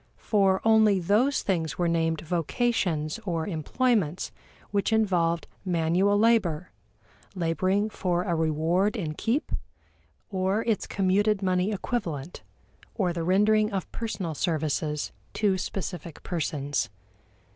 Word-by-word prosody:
For 195 -3 +2
only 220 -3 +5
those 215 +10 +2
things 165 -5 -1
were 175 - +1
named 165 -1 +1
vocations 170 - 0
or 170 -5 -2
employments 185 - 0 0.4
which 200 +2 0
involved 180 -6 +2 0.2
manual 180 +3 +2
labor, 200 -7 +2 0.6
laboring 185 +4 +1
for 180 -4 -1
a 175 - -1
reward 165 +6 +1
in 165 -9 -3
keep, 235 - -1 0.8
or 190 +3 0
its 225 -3 0
commuted 200 +2 +1
money 185 +2 +1
equivalent, 180 - -3 0.5
or 185 -5 0
the 170 - -3
rendering 210 +4 +3
of 195 -3 -3
personal 195 -7 -3
services 155 -1 -1 0.2
to 195 -3 +1
specific 175 -4 -5
persons. 150 -5 -2
185 Hz, 115 wpm, -27 LUFS, 165-210 Hz, 0.8 s, only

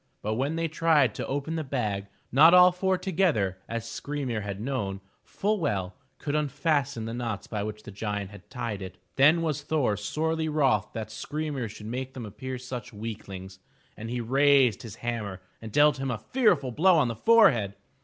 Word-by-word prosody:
But 110 - -1
when 135 +7 -1
they 165 0 0
tried 155 -4 +3
to - - -5
open 145 +4 -2
the 160 - -2
bag, 105 -8 -2 0.2
not 160 +7 +7
all 180 0 +8
four 185 +1 0
together, 165 - 0
as 115 -1 -3
Skry'mir 135 -5 -3
had 100 -1 -5
known 105 -6 -3 0.2
full 210 +1 -1
well, 100 - -1 0.2
could 145 - -4
unfasten 145 -4 0
the 115 - -4
knots 115 -4 -3
by 105 -2 -4
which 105 +1 -5
the - - -9
giant 105 -1 -4
had 100 -2 -14
tied 120 -6 -4
it. 95 0 -8 0.2
Then 155 +5 +5
was 150 -3 -1
Thor 145 -8 +1
sorely 160 +9 -1
wroth 135 -10 +2
that 110 -1 -5
Skry'mir 145 0 -4
should 105 +1 -10
make 130 +4 -5
them 125 -3 -6
appear 130 +5 -6
such 125 -2 -7
weaklings, 100 -3 -7 0.4
and 110 +1 -7
he 120 0 -2
raised 135 -1 +4
his 110 -5 -9
hammer 105 -5 -3 0.2
and 110 -1 -8
dealt 145 +2 +5
him 135 0 -2
a 120 - -1
fearful 155 - +1
blow 180 +9 +4
on 145 - +3
the 115 - -3
forehead. 120 - +4
125 Hz, 185 wpm, -27 LUFS, 105-150 Hz, 0.4 s, all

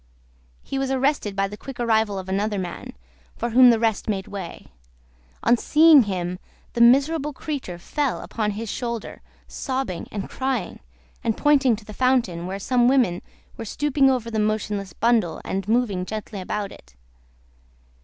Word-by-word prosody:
He 270 - -3
was 270 -1 -1
arrested 265 -6 0
by 195 0 +1
the 205 - -8
quick 270 +1 -9
arrival 220 -3 +1
of 190 -1 -6
another 205 +2 -1
man, 190 +7 -6 0.4
for 235 - -3
whom 250 +2 +8
the 235 - +5
rest 225 -2 0
made 195 -3 -2
way. 195 -4 -7 0.8
On 240 - +5
seeing 310 +3 +6
him, 180 -2 -3 0.3
the 235 - 0
miserable 280 +5 +4
creature 270 - -5
fell 280 - -2
upon 215 -2 -2
his 225 +1 -4
shoulder, 235 +1 -5 0.3
sobbing 260 - -4
and 200 -2 -4
crying, 260 -2 -3 0.4
and 225 - 0
pointing 275 -5 +4
to 210 0 -13
the 210 - -9
fountain, 230 -9 +1
where 190 +1 -4
some 240 +4 +2
women 245 -10 +2 0.4
were 230 - -5
stooping 275 +3 +2
over 245 -3 -1
the 220 - -1
motionless 210 -2 -1
bundle, 225 -6 +1
and 195 0 -3
moving 220 -5 +1
gently 210 0 -6
about 200 +2 -3
it. 65 +1 -16
225 Hz, 160 wpm, -23 LUFS, 195-260 Hz, 0.8 s, whom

